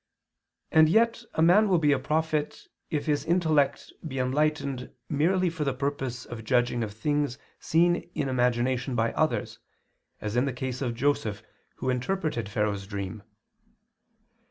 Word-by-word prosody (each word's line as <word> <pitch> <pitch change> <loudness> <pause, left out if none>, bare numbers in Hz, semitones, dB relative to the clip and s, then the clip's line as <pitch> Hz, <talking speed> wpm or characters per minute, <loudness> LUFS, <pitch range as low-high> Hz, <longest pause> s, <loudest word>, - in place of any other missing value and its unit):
And 155 -1 +6
yet 230 +5 +3
a 160 - +3
man 200 +6 +5
will 185 - +4
be 150 -3 +3
a 140 - +3
prophet, 155 +1 -1 0.2
if 150 -2 -2
his 145 -3 +1
intellect 160 -4 +1
be 135 -3 -5
enlightened 140 0 0 0.2
merely 180 +5 +2
for 165 -2 -2
the 135 -2 -1
purpose 130 -2 -3
of 115 -2 -8
judging 120 0 +1
of 105 - -4
things 145 +4 -1 0.2
seen 175 +2 +2
in 140 - -1
imagination 125 0 +1
by 115 -1 +1
others, - - -1 0.6
as 105 +1 -4
in 125 +2 +3
the 135 - -2
case 125 +1 -4
of 120 -3 -1
Joseph 115 -5 0 0.3
who 130 - -1
interpreted 130 - -2
Pharaoh's 105 -2 -1
dream. 100 0 -5
135 Hz, 150 wpm, -27 LUFS, 120-155 Hz, 0.6 s, And